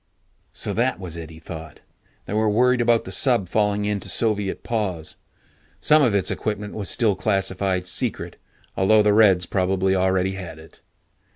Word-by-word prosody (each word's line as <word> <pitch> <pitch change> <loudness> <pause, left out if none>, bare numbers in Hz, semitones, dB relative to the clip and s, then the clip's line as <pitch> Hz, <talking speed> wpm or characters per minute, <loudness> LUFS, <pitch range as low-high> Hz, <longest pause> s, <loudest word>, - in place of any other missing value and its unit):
So - - -4
that 125 +1 0
was 90 -3 -5
it, 80 -2 -7
he 80 - -12
thought. 80 -1 -10 0.5
They - - -6
were 110 0 +2
worried 125 +3 +3
about 115 -1 +2
the 95 - -7
sub 115 -1 +2
falling 105 +1 0
into 105 -1 -3
Soviet 105 -4 0
paws. 95 -9 -3 0.6
Some 155 0 +4
of 120 -7 +2
its 95 - 0
equipment 105 -1 -4
was 100 -3 -5
still 110 -5 +1
classified 95 -1 -1
"secret", - - -3 0.4
although 105 +3 +4
the 105 -1 +3
Reds 100 -5 +5
probably 95 +1 0
already 95 0 +1
had 90 -4 -7
it. 80 0 -16
100 Hz, 165 wpm, -22 LUFS, 90-110 Hz, 0.6 s, Reds